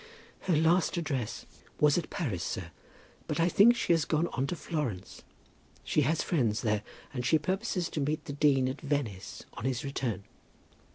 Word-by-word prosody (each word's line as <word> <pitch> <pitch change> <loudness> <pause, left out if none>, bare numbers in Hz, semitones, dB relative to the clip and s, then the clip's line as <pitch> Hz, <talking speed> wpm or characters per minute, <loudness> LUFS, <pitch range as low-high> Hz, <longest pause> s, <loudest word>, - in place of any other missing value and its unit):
"Her 180 - +1
last 165 +4 +3
address 135 -9 -2 0.3
was 150 -1 +5
at 175 - -1
Paris, 115 - -2
sir; - - -4 0.6
but - - -2
I 165 - +4
think 210 +7 +6
she 175 - +2
has 165 -2 +3
gone 155 +2 +1
on 135 +1 0
to 175 - -2
Florence. 145 - -4 0.6
She 150 - +2
has 155 +4 +1
friends 120 -10 +1
there, 105 -2 +1 0.3
and 125 -2 -2
she 160 +6 +4
purposes 180 +2 -1
to 150 - -2
meet 150 +3 -1
the 145 - -5
dean 140 -3 +3
at 130 +3 -4
Venice 140 - -3
on 105 - -7
his 130 -2 -1
return." 120 -8 -2
145 Hz, 175 wpm, -30 LUFS, 125-165 Hz, 0.6 s, think